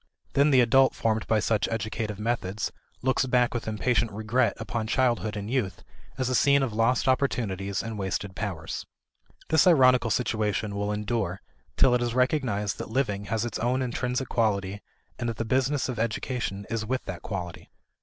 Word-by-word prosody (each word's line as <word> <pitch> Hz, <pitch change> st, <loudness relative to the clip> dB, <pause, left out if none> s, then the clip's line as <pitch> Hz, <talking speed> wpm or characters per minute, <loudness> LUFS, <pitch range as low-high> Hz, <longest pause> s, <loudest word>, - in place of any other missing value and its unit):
Then 140 Hz, +2 st, +4 dB
the 130 Hz, -3 st, +6 dB
adult 135 Hz, +3 st, +4 dB
formed 110 Hz, -1 st, 0 dB
by 110 Hz, -, +3 dB
such 110 Hz, 0 st, +1 dB
educative 110 Hz, -1 st, -3 dB
methods 105 Hz, -2 st, -2 dB, 0.3 s
looks 130 Hz, 0 st, +2 dB
back 125 Hz, -1 st, +2 dB
with 120 Hz, -, -4 dB
impatient 115 Hz, +1 st, +1 dB
regret 110 Hz, +5 st, +1 dB
upon 115 Hz, -2 st, -3 dB
childhood 120 Hz, -3 st, +1 dB
and 100 Hz, 0 st, -5 dB
youth 120 Hz, -5 st, -2 dB, 0.3 s
as 130 Hz, -, 0 dB
a 130 Hz, -, 0 dB
scene 140 Hz, +2 st, +4 dB
of 125 Hz, -5 st, -2 dB
lost 115 Hz, +5 st, +2 dB
opportunities 100 Hz, -8 st, 0 dB
and 115 Hz, -2 st, -5 dB
wasted 95 Hz, 0 st, -3 dB
powers. 95 Hz, -8 st, -4 dB, 0.7 s
This 160 Hz, +2 st, +5 dB
ironical 130 Hz, -7 st, +5 dB
situation 110 Hz, -3 st, 0 dB
will 100 Hz, +1 st, -1 dB
endure 105 Hz, -3 st, -2 dB, 0.4 s
till 130 Hz, -2 st, +5 dB
it 125 Hz, -, +2 dB
is 120 Hz, -1 st, -1 dB
recognized 125 Hz, -7 st, 0 dB
that -, -, -5 dB
living 105 Hz, -5 st, -1 dB
has 110 Hz, +2 st, -1 dB
its 120 Hz, -, -4 dB
own 125 Hz, +3 st, +1 dB
intrinsic 125 Hz, +1 st, -2 dB
quality 100 Hz, -3 st, 0 dB, 0.4 s
and 120 Hz, -1 st, -1 dB
that 115 Hz, -, -4 dB
the 115 Hz, -, -2 dB
business 130 Hz, +4 st, +1 dB
of 125 Hz, -3 st, -4 dB
education 110 Hz, -2 st, -2 dB
is 115 Hz, -1 st, -1 dB
with 130 Hz, +4 st, -2 dB
that 90 Hz, -, -6 dB
quality. 90 Hz, -4 st, -6 dB
115 Hz, 175 wpm, -27 LUFS, 105-125 Hz, 0.7 s, the